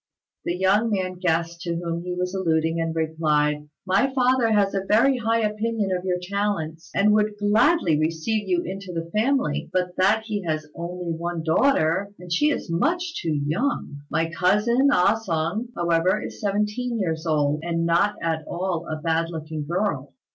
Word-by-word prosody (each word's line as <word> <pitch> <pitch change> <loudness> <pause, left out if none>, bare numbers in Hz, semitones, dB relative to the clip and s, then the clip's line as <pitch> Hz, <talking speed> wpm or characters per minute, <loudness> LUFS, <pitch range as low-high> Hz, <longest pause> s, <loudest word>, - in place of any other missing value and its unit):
The 175 - -1
young 200 +5 +3
man 185 -3 -2
guessed 170 -1 0
to 170 -1 -2
whom 170 0 -3
he 180 0 -4
was 180 +1 -2
alluding, 165 -3 0
and 165 0 -2
replied, 150 -2 0 0.2
"My 200 +8 +2
father 255 -2 +2
has 205 -2 +3
a 195 -1 -1
very 250 +6 +3
high 230 0 +1
opinion 215 -1 -1
of 180 - -4
your 180 -1 +1
talents, 180 -4 -3
and 210 +1 +4
would 210 0 +1
gladly 205 - +3
receive 165 +7 -1
you 175 -1 +2
into 190 +1 -6
the 165 -1 -5
family, 265 +7 0
but 180 -1 -1
that 205 +4 +3
he 210 -2 -2
has 155 -3 -3
only 175 0 -5
one 170 0 -3
daughter, 185 - +2
and 175 -1 -6
she 295 +12 +3
is 290 - -2
much 330 - 0
too 150 -4 -1
young. 155 - -2
My 165 0 0
cousin, 210 - +3
Ah 190 -3 +4
sung, 170 +6 -1
however, 170 +3 +2
is - - -8
seventeen 210 +4 -1
years 165 -5 -2
old, 150 -1 +1
and 165 -1 -1
not 175 +5 +2
at 160 -1 -1
all 175 -2 -3
a 155 0 -4
bad 165 +1 0
looking 155 -2 -5
girl. 170 -5 -2
180 Hz, 175 wpm, -24 LUFS, 165-210 Hz, 0.2 s, and